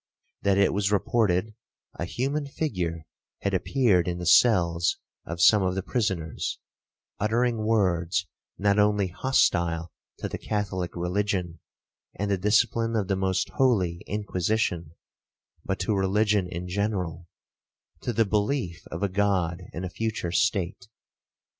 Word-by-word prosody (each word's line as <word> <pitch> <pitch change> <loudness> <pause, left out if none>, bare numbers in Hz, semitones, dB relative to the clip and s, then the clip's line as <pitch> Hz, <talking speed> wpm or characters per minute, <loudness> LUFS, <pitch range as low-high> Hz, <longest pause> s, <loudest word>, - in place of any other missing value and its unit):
That 100 -1 +2
it 100 -1 +3
was 100 +1 0
reported 105 -1 +1 0.5
a 85 - -1
human 140 +9 -2
figure 90 - -3 0.4
had 100 - 0
appeared 95 -3 +2
in 90 -1 -1
the 90 - -5
cells 85 -4 +4 0.3
of 85 +1 -5
some 105 +5 +6
of 95 -1 0
the 95 - -2
prisoners, 95 - -2 0.6
uttering 115 +1 +1
words 95 -4 +1 0.3
not 100 +1 +2
only 105 -2 +3
hostile 85 -7 +1 0.3
to - - -4
the - - -6
Catholic 95 -4 -3
religion, 90 -1 -1 0.6
and 100 0 -2
the 100 - +1
discipline 115 +3 +2
of 105 -3 -1
the 95 - +2
most 95 -1 0
holy 95 -10 +2
Inquisition, 95 -5 -1 0.7
but 95 - -2
to 100 +3 +1
religion 100 0 +2
in 90 +1 -5
general, 90 -3 -2 0.7
to - - -2
the 115 -1 +2
belief 105 - -1
of - - -5
a - - +3
God 95 -3 0
and 90 +3 -5
a - - -4
future 110 -4 -3
state. 95 -1 0
95 Hz, 135 wpm, -26 LUFS, 90-105 Hz, 0.7 s, some